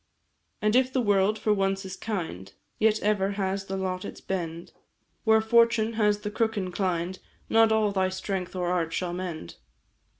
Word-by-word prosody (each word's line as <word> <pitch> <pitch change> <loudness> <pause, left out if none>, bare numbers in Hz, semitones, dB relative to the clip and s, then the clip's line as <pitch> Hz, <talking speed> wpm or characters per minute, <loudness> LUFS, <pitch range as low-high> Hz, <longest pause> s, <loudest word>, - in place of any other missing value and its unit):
"And 215 +2 +3
if 260 0 +4
the 260 - 0
world 205 -2 +2
for 215 0 +1
once 195 -1 0
is 190 0 -6
kind, 165 - -5 0.3
Yet 220 0 +3
ever 200 -1 +1
has 195 0 -2
the 195 0 -4
lot 185 -1 -2
its - - -7
bend; 170 -3 -4 0.5
Where 220 0 +5
fortune 230 0 +3
has 210 -2 +2
the 210 0 -4
crook 220 0 0
inclined, 185 -1 -2 0.3
Not 225 0 +5
all 215 -2 +3
thy 190 -1 +1
strength 190 -1 -4
or 180 -1 -1
art 165 -2 0
shall 175 0 -2
mend. 175 - -6
195 Hz, 170 wpm, -27 LUFS, 185-220 Hz, 0.5 s, Where